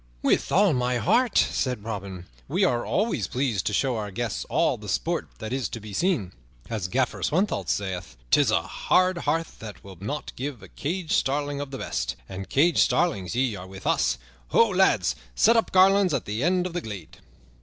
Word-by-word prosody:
"With - - +2
all 195 -2 +4
my 125 -1 +1
heart," 235 - +2
said 125 -6 +1
Robin, 100 -5 -6 0.2
"we - - +1
are 120 - +1
always 215 +5 0
pleased 125 -7 -1
to 105 - 0
show 130 +3 +1
our 105 -1 -3
guests 115 +3 -3
all - - +1
the - - -9
sport - - -1
that 110 +2 -5
is 130 -2 -1
to 115 - -6
be 105 -1 -10
seen. 145 - 0 0.4
As 105 -5 -2
Gaffer 130 +6 -1
Swanthold 165 - 0
sayeth, 95 -7 -3
''Tis - - +5
a - - +2
hard 185 -1 +1
heart 165 0 0
that 110 -2 -9
will 95 -3 -12
not 145 +9 -4
give 130 -5 -5
a 95 - -12
caged 170 +2 -4
starling 145 +1 0
of 145 - -5
the 135 - -6
best'; - - -3
and 95 0 -7
caged 165 +5 +3
starlings 100 - +2
ye 125 -3 +1
are 95 -1 -8
with 95 0 -11
us. - - +2 0.3
Ho, 230 - +4
lads! 120 - +3 0.2
Set 230 - +5
up 225 - +2
a - - -20
garland 190 -1 +5
at 130 - -3
the 105 +3 -3
end 180 +2 +2
of 180 - -4
the 175 - -2
glade." 100 - -8
125 Hz, 200 wpm, -26 LUFS, -, 0.4 s, Tis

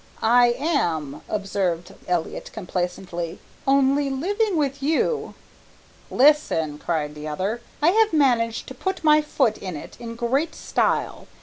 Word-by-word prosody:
"I 240 +1 +5
am," 170 - -1
observed 190 -4 -2
Elliott 175 -3 -2
complacently, 180 -3 -4 0.3
"only 275 +1 +3
living 390 +8 0
with 280 -2 -1
you 320 - 0 0.4
" - - -29 0.2
"Listen!" 160 - +3
cried 150 -3 -2
the 150 0 -7
other. 195 +10 -2 0.2
"I 320 - +6
have 435 +3 +4
managed 240 -7 +2
to - - -7
put 380 +5 -3
my 305 -1 +6
foot 265 -7 0
in 185 -4 -5
it - - -10
in 230 -1 -7
great 265 +7 0
style. - - -1
240 Hz, 135 wpm, -23 LUFS, 180-295 Hz, 0.4 s, I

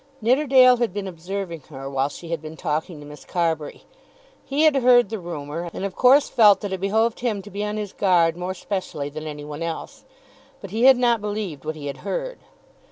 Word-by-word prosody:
Nidderdale 255 +1 +5
had 235 -5 -1
been 200 -1 -3
observing 180 0 -5
her 135 -2 -8
while 135 0 -1
she 170 +2 -10
had 165 -2 -3
been 160 0 -9
talking 155 0 -3
to 145 - -11
Miss 150 0 -12
Carbury. 165 -4 -2 0.6
He 275 +3 0
had 310 -3 +5
heard 245 -4 +5
the 220 -1 -4
rumour, 170 -1 -6
and 195 - -3
of 195 - -5
course 270 +3 +5
felt 210 -3 +5
that 205 -3 -4
it 190 - -3
behoved 220 +3 +1
him 220 -5 -2
to 205 - -12
be 200 +2 -4
on 210 0 -3
his 210 -2 -5
guard 175 -4 +3
more 180 +1 -4
specially 175 -7 -4
than 155 +2 -7
any 150 -1 -7
one 150 +1 -7
else. 165 -1 -5 0.6
But 195 - -10
he 225 +4 +1
had 265 -1 +8
not 240 -3 +2
believed 205 -9 -4
what 155 0 -3
he 150 -2 -9
had 140 -1 -5
heard. - - -4
190 Hz, 215 wpm, -23 LUFS, 155-225 Hz, 0.6 s, had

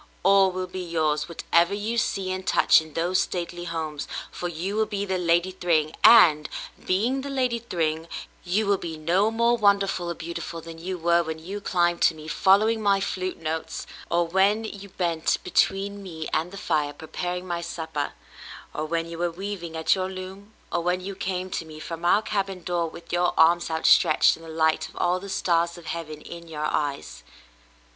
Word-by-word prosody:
All 195 0 +5
will 185 0 -3
be 185 +1 -6
yours, 155 -3 0
whatever 170 +2 +2
you 215 +3 -2
see 195 -4 0
and 185 0 -3
touch - - +5
in 160 -1 -12
those 175 +3 +2
stately 175 -1 -4
homes 160 -3 -4
— - - -7
for 175 - -4
you 175 +4 -4
will 220 0 +1
be 200 -1 -2
the 190 -2 -1
Lady 175 +1 +2
Thryng, 160 -4 +1
and, 155 -10 +7 0.3
being 230 +9 +1
the 280 - -6
Lady 255 -3 0
Thryng, 165 -7 -2 0.4
you 195 +5 +1
will 200 -1 +2
be 165 -2 -5
no 175 +7 +2
more 235 +1 +2
wonderful 200 -5 +2
or 170 - -3
beautiful 170 0 -6
than 165 0 -10
you 185 +2 -4
were 170 0 +3
when 160 -1 -4
you 190 +6 -7
climbed 175 -3 +1
to - - +4
me, 155 0 -10
following 215 +6 +3
my 200 -2 +3
flute 185 -2 -3
notes, 160 0 -4 0.2
or 170 0 +2
w^hen 200 +3 +1
you 200 - -10
bent 170 -4 0
between 200 +2 +1
me 160 -5 -6
and 160 +3 0
the 200 - -8
fire 150 -6 0
preparing 180 +4 -5
my 175 -1 -3
supper, 160 -3 -4 0.6
or 155 - -3
when 165 +1 -2
you 170 0 -8
were 175 0 0
weav 195 +2 -5
ing 165 -1 -6
at 160 - +3
your 185 -1 -1
loom, 190 +2 -8 0.2
or - - 0
when 180 +1 0
you 195 +2 -6
came 185 -1 -3
to - - -2
me 155 -1 -11
from 165 +1 -7
our 200 +5 +4
cabin 195 -4 -2
door 175 -1 -1
with 170 +1 -11
your 175 0 +2
arms 170 +2 +4
outstretched 160 0 +4
and 165 - -15
the 165 - -10
light 160 0 +1
of - - -18
all 180 +1 +1
the 200 +1 -9
stars 170 -3 +1
of 170 - -12
heaven 155 -3 -5
in 170 +1 -10
your 155 -2 -4
eyes." 140 - -2
175 Hz, 200 wpm, -25 LUFS, 165-195 Hz, 0.6 s, and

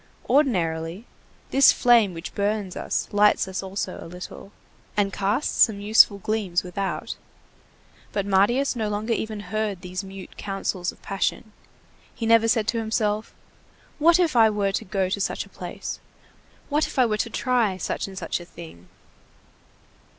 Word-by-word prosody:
Ordinarily, 180 - +1 0.5
this 275 0 +7
flame 230 -7 +4
which 165 +2 -7
burns 205 -2 -1
us - - -2
lights 205 -1 +4
us 190 0 -4
also 195 +1 -4
a - - -9
little, 180 +3 -9 0.5
and 200 -1 +1
casts 205 +8 0
some 215 -3 -7
useful 205 0 +5
gleams 200 -3 -1
without. 180 -2 -4 0.9
But 200 -2 -1
Marius 205 +8 +2
no 220 -3 -1
longer 210 +3 -1
even 220 -2 -3
heard 205 -1 -3
these 185 +1 -5
mute 195 -1 -10
counsels 195 -2 -3
of - - -22
passion. 195 +2 -2 0.6
He 230 - -4
never 225 0 +5
said 225 -2 +2
to 230 - 0
himself: 220 -1 -1 0.6
"What 330 +3 +6
if 340 -6 +1
I 225 -2 +6
were 205 -2 0
to 215 +3 -3
go 190 0 0
to 195 +2 -2
such - - -2
a - - -18
place? - - -7 0.7
What 300 +1 +1
if - - -10
I 255 - +5
were 215 -2 0
to 230 - -1
try 235 -5 +1
such 185 - -3
and 190 -1 -10
such - - -2
a 175 - -10
thing?" 160 - -12
205 Hz, 160 wpm, -24 LUFS, 190-225 Hz, 0.9 s, this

